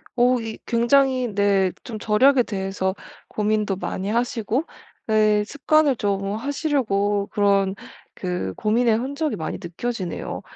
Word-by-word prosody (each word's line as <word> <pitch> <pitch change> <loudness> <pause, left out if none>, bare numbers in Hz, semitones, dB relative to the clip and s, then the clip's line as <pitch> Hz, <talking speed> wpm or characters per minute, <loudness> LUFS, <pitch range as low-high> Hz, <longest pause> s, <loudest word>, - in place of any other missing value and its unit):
어 250 0 +3
이 225 -1 -6
굉장히 255 0 +2
네 200 -2 +3
좀 220 -3 -7
절약에 250 +5 +4
대해서 195 -2 -2 0.3
고민도 210 -1 0
많이 195 +1 -4
하시고 235 +3 0 0.4
네 215 -1 +3
습관을 290 +1 +2
좀 200 -1 -1
하시려고 220 -7 0
그런 200 -1 +2 0.4
그 180 - -3
고민의 225 +1 +2
흔적이 280 +5 -2
많이 160 - -4
느껴지네요. 185 +1 -4
215 Hz, 260 characters per minute, -23 LUFS, 200-250 Hz, 0.4 s, 절약에